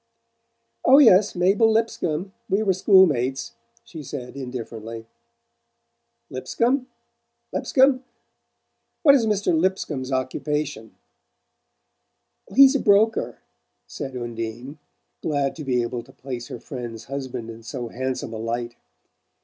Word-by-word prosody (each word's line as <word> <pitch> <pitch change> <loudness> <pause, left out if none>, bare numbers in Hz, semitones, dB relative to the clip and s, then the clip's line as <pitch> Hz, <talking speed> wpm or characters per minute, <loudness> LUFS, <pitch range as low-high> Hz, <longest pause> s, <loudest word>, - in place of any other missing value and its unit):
"Oh, 270 - +7
yes 210 -9 +6
Mabel 195 +5 +3
Lipscomb. 195 -5 -1 0.2
We 200 +3 +1
were 195 -3 +2
school 190 +1 +6
mates," 135 - -2 0.3
she 160 - -10
said 125 -2 -7
indifferently. 115 -4 -7 1.3
"Lipscomb? 245 - 0 0.7
Lipscomb? 265 -1 +3 1.0
What 285 -4 +8
is 240 -5 +3
Mr. 205 -5 +1
Lipscomb's 160 -6 -1
occupation?" 135 -1 -3 1.6
"He's 270 +1 +7
a 280 - +1
broker," 215 +1 +2 0.4
said 135 -1 -6
Undine, 120 +4 -6 0.4
glad 140 -3 -1
to 155 - -6
be 125 -3 +1
able 120 0 -4
to 120 - -18
place 125 -3 -7
her - - -7
friend's 120 -3 -7
husband 130 -2 -6
in 115 0 -11
so 120 0 -6
handsome 130 -2 -4
a - - -5
light. 120 +1 -4
140 Hz, 115 wpm, -23 LUFS, 120-195 Hz, 1.6 s, What